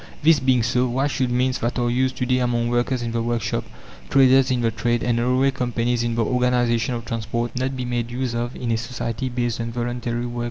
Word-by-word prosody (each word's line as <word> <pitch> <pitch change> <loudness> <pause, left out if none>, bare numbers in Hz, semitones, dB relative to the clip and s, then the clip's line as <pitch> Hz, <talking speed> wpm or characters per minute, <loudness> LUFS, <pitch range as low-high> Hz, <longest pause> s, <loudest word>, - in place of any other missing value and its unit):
This 160 0 +6
being 130 -2 +2
so, 125 +2 +1
why 130 +3 0
should 135 -3 0
means 125 +1 +1
that 120 +2 -2
are 120 -1 +1
used 130 +2 +1
to 125 - -1
day 125 0 +2
among 120 -1 0
workers 120 +1 0
in 115 - -3
the 115 0 -1
workshop, 115 -2 -1 0.5
traders 135 0 +5
in 125 -2 +1
the 115 -1 +1
trade, 120 +1 0
and 120 -1 +1
railway 130 +3 +2
companies 120 -1 -1
in 120 -1 -1
the 115 -1 +1
organization 125 -1 +1
of 115 -1 -6
transport, 115 0 -3
not 130 +1 -2
be 125 - -3
made 120 -1 -2
use 125 0 -3
of 120 +1 -3
in 120 -2 -3
a 115 - +2
society 115 +1 -4
based 120 -1 -2
on 115 0 -4
voluntary 120 0 -3
work? 120 0 -5
120 Hz, 230 wpm, -22 LUFS, 120-125 Hz, 0.5 s, This